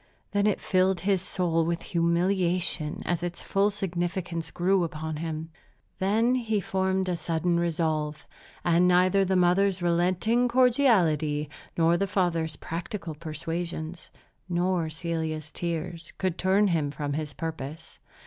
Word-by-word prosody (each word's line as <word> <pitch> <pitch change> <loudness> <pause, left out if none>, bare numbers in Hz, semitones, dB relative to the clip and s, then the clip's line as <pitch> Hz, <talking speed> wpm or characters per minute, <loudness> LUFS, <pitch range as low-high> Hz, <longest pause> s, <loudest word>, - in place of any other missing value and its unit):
Then 205 0 +2
it 210 - +1
filled 185 0 +2
his 190 -1 +1
soul 175 -3 0
with 170 +1 -2
humiliation 175 -1 +1
as 175 -1 -1
its 175 0 -4
full 200 +1 +1
significance 175 -3 -2
grew 185 +1 +2
upon 160 -1 -4
him. 160 0 -4 0.5
Then 220 +6 +2
he 225 -4 0
formed 190 0 0
a 180 - 0
sudden 170 +1 0
resolve; 155 -3 -1 0.4
and 175 +1 +4
neither 185 +2 +4
the 190 0 +1
mother's 185 +2 +3
relenting 180 +8 +2
cordiality, 190 - +3 0.3
nor 170 +1 +4
the 200 - 0
father's 165 -5 0
practical 170 +2 -5
persuasions, 165 +2 -5 0.4
nor 175 -1 0
Celia's 160 -2 -3
tears, 170 0 -4
could 185 -3 -1
turn 195 +3 +3
him 155 -5 +1
from 145 0 -4
his 150 -1 -3
purpose. 160 -1 -6
175 Hz, 130 wpm, -27 LUFS, 160-190 Hz, 0.5 s, and